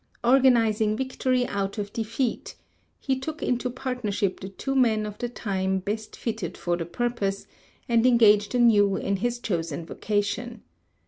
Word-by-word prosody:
"Organizing 230 -4 +4
victory 260 -1 0
out 200 -1 -3
of 205 -1 -4
defeat," 230 +2 -2 0.4
he 265 -1 -1
took 305 +4 -5
into 250 0 0
partnership 245 -7 -2
the 190 - -7
two 270 +8 -4
men 225 -5 +3
of 210 0 -7
the 240 - -2
time 190 -5 -1
best 210 +3 -4
fitted 230 - -4
for 175 -1 -1
the 165 -1 -4
purpose, 205 -1 -2 0.4
and 235 -1 +3
engaged 215 -3 +5
anew 210 -5 +5
in 200 +1 -1
his 240 +4 -1
chosen 170 -7 -3
vocation. 215 +5 -2
220 Hz, 145 wpm, -26 LUFS, 200-245 Hz, 0.4 s, engaged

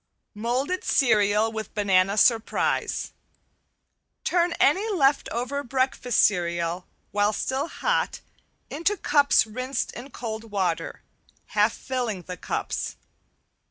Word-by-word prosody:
~MOLDED 255 - -1
CEREAL 215 -3 +3
WITH 220 -1 -6
BANANA 195 -1 +2
SURPRISE~ 225 +1 +1 1.1
Turn 345 -1 +1
any 380 +11 +2
left 285 -7 +2
over 255 +5 -3
breakfast 260 -2 +1
cereal, 170 -2 0 0.2
while 205 +1 +2
still 265 +7 -2
hot, - - -1 0.5
into 340 +7 0
cups 290 -7 +4
rinsed 255 +5 -3
in 250 +4 -9
cold 225 -3 -6
water, 185 -5 -2 0.5
half 210 +2 +2
filling 240 -8 -3
the 180 +2 -6
cups. - - -3
235 Hz, 105 wpm, -25 LUFS, 205-275 Hz, 1.1 s, cups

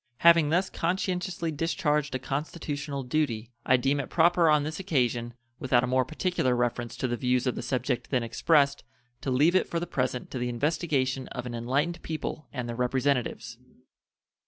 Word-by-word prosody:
Having 170 -1 +6
thus 180 +4 +2
conscientiously 180 -1 -2
discharged 150 -2 0
a - - +2
constitutional 145 0 -4
duty, 125 -4 -1 0.2
I 130 - +6
deem 135 +3 +1
it 140 - -4
proper 170 0 +4
on 150 -1 +4
this 155 +4 -4
occasion, 120 -9 0 0.2
without 125 -2 +2
a - - 0
more 130 0 +2
particular 155 -3 0
reference 120 -1 -1
to 130 - -1
the 120 - -1
views 125 0 +1
of 125 - +1
the - - -5
subject 130 -1 -2
then 125 -3 +1
expressed 140 +4 +2 0.4
to - - -3
leave 145 +7 +4
it 185 - +3
for 170 - -2
the 175 - -3
present 125 -5 -2
to 130 - -4
the 125 0 -1
investigation 135 0 0
of 125 - -6
an 120 - -5
enlightened 140 +9 -1
people 155 -1 -5
and 125 -1 -4
their 120 - -4
representatives. 125 +1 -1
140 Hz, 180 wpm, -28 LUFS, 125-160 Hz, 0.4 s, Having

